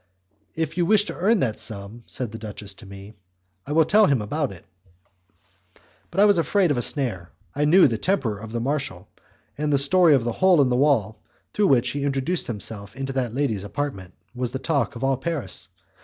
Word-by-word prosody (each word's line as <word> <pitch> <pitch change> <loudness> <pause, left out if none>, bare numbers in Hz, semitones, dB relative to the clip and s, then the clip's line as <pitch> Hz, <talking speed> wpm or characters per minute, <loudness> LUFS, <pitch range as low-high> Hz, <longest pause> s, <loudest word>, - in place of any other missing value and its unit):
"If 160 +1 -3
you 175 -1 +1
wish 210 0 +4
to - - -6
earn 205 +3 +2
that 115 -4 -1
sum," 105 +2 -4
said 125 -4 -3
the 115 - -8
duchess 105 -2 -6
to 100 +1 -13
me, 100 +2 -11 0.5
"I - - -5
will 160 0 +4
tell 210 +4 +5
him 140 - +3
all - - -4
about 145 +5 -2
it." 90 -2 -13 1.4
But 190 - -4
I 205 - +7
was 205 -4 +4
afraid 180 0 +2
of 140 - 0
a - - +1
snare; 115 - -3 0.2
I 145 +2 0
knew 175 +4 +6
the 115 -4 -2
temper 135 - 0
of 110 +1 -9
the 120 - -2
marshal, 130 -8 -3 0.5
and 150 0 0
the 140 - +4
story 160 +3 +5
of 130 - +1
the 120 - -1
hole 185 +5 +3
in 135 -3 +4
the 125 - +1
wall 125 -6 +1 0.3
through 205 -1 +2
which 125 -5 +3
he 140 0 -3
introduced 140 +5 -1
himself 100 -2 -5
into 135 0 -4
that 125 -3 -2
lady's 125 -9 -1
apartment, 100 - -5 0.2
was 125 -1 -3
the 130 - -3
talk 140 -1 -1
of 120 - -6
all 135 -1 +1
Paris. 160 0 -3
135 Hz, 215 wpm, -23 LUFS, 110-155 Hz, 1.4 s, I